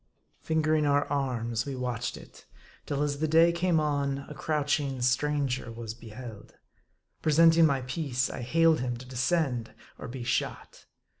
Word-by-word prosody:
Fingering 155 -1 +1
our 145 0 +3
arms, 120 -4 -1
we 140 - -3
watched 125 -2 -3
it; - - -15 0.4
till 145 0 -1
as 145 -1 -2
the 155 - +1
day 165 +2 +5
came 170 -1 +1
on, 140 -2 -1
a - - -8
crouching 145 -3 -1
stranger 130 0 0
was 115 -1 -6
beheld. 115 -1 -11 0.7
Presenting 165 +1 +5
my 140 -3 0
piece, 130 -1 -1
I - - -6
hailed 165 +5 +3
him 125 -1 -2
to 125 - -10
descend 130 -2 -1 0.2
or - - -7
be 125 +1 -6
shot. 120 - -3
140 Hz, 150 wpm, -28 LUFS, 125-155 Hz, 0.7 s, day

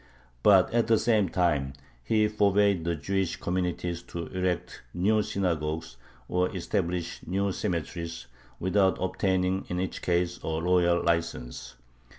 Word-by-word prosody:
But 95 - +5
at 120 -1 +2
the 115 -1 +5
same 110 -4 +2
time 75 -7 +1 0.3
he 110 - +2
forbade 100 -4 +2
the 85 0 0
Jewish 95 +4 -1
communities 90 -1 -2
to 85 -1 -5
erect 90 -1 -2
new 105 +5 +3
synagogues 80 -8 -2 0.3
or 90 0 +1
establish 90 -2 -2
new 100 +2 0
cemeteries, 85 -3 -3 0.3
without 95 +1 +2
obtaining 95 0 0
in 90 - -2
each 95 0 -3
case 85 0 0
a 80 0 -1
royal 85 0 +3
license. 85 -7 -2
90 Hz, 130 wpm, -28 LUFS, 85-100 Hz, 0.3 s, But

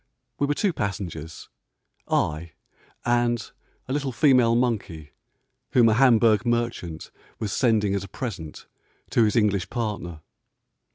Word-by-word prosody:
We 145 - +1
were 145 - 0
two 195 +1 +1
passengers; 85 - -5 0.6
I 80 +1 -1 0.5
and 120 -2 +1 0.4
a 130 - -3
little 140 -2 -1
female 125 -3 +4
monkey, 100 -11 -2 0.6
whom 120 -2 +6
a - - +3
Hamburg 115 -3 +4
merchant 115 -9 -2 0.3
was 110 -3 -3
sending 110 -5 +2
as 100 -1 -1
a - - -8
present 90 - -7 0.5
to 115 - +4
his 105 - 0
English 105 -5 +1
partner. 105 -9 -4
110 Hz, 125 wpm, -25 LUFS, 95-120 Hz, 0.6 s, whom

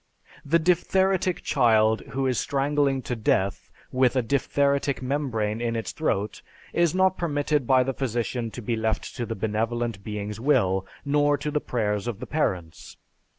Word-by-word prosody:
The 160 +4 +3
diphtheritic 185 +2 +1
child 110 -4 +3
who 135 0 0
is 130 -2 +1
strangling 140 -1 +1
to 125 - -3
death 100 -3 0 0.2
with 130 0 +2
a 130 - +2
diphtheritic 140 +2 +1
membrane 125 -5 -1
in 115 -1 -1
its 115 - -3
throat 105 -10 -2 0.3
is 170 -1 +2
not 190 0 +3
permitted 145 -4 0
by 130 -1 +5
the 135 +1 -2
physician 120 -2 -2
to 120 +2 -8
be 115 +2 -1
left 110 0 -2
to 120 -2 -3
the 115 - -3
benevolent 110 +1 -2
being's 105 0 -5
will, 95 -8 +2 0.2
nor 145 0 +3
to 150 - -3
the 150 0 0
prayers 105 -2 -1
of 115 -4 -3
the - - -5
parents. 90 - -3
125 Hz, 160 wpm, -25 LUFS, 110-145 Hz, 0.3 s, by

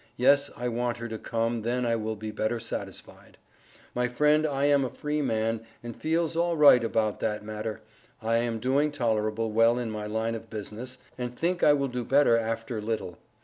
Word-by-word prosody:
Yes 140 +3 +4
I 125 - -2
want 120 0 -1
her 115 0 -5
to 110 -1 -6
come 115 0 -1
then 120 +3 -1
I 115 -1 +2
will 110 0 -2
be 110 +1 -6
better 110 +2 -1
satisfied. 115 - -7 0.6
My 125 0 +1
friend 150 +5 +3
I 140 -1 0
am 145 -1 +4
a 130 - -2
free 150 +3 -2
man 110 -3 0 0.2
and 120 -1 -6
feeles 165 +1 0
alright 160 -7 +5
about 110 -2 0
that 105 -1 -2
matter. 110 0 -5 0.4
I 115 +1 +1
am 115 -1 0
doing 135 +6 +1
tolrable 110 -3 0
well 115 +2 +4
in 120 -3 -2
my 105 -1 -4
line 110 +2 -1
of 115 0 -7
business, 110 +4 -6 0.2
and 125 0 -4
think 175 +1 0
I 145 - +6
will 140 -1 +1
do 125 -1 -3
better 135 -1 +4
after 115 0 -2
little. 105 -5 -4
115 Hz, 190 wpm, -27 LUFS, 110-135 Hz, 0.6 s, I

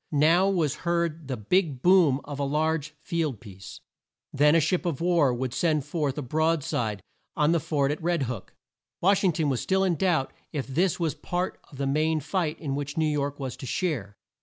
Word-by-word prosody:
Now 165 +6 +4
was 160 -7 0
heard 170 -3 -1
the 130 -2 -3
big 140 - 0
boom 175 -7 +5
of 145 -1 -7
a - - 0
large 155 +1 -1
field 155 - -2
piece. 95 -4 -11 0.5
Then 150 +2 +4
a - - +6
ship 170 +4 +1
of 170 -7 -2
war 170 -6 +3
would 125 0 -3
send 155 -5 +1
forth 150 -3 -2
a 150 - -2
broad 155 +4 +1
side 105 -8 -2 0.3
on 150 0 +3
the 170 - +3
fort 145 -3 0
at 150 - -4
Red 170 -3 +1
Hook. 115 -6 -6 0.4
Wash 195 +3 +3
ing 185 - +4
ton 155 -1 0
was 130 -3 0
still 190 0 +1
in 185 -2 +2
doubt 165 -5 +1 0.2
if 145 -4 -3
this 170 +8 0
was 165 -3 0
part 180 +1 -3
of 140 - -12
the 140 - -1
main 155 +3 +1
fight 160 +1 -2
in 140 -4 -3
which 145 +1 -4
New 160 - +2
York 145 -2 -1
was 130 -2 -4
to 130 - -7
share. 120 - -2
155 Hz, 210 wpm, -26 LUFS, 135-170 Hz, 0.5 s, a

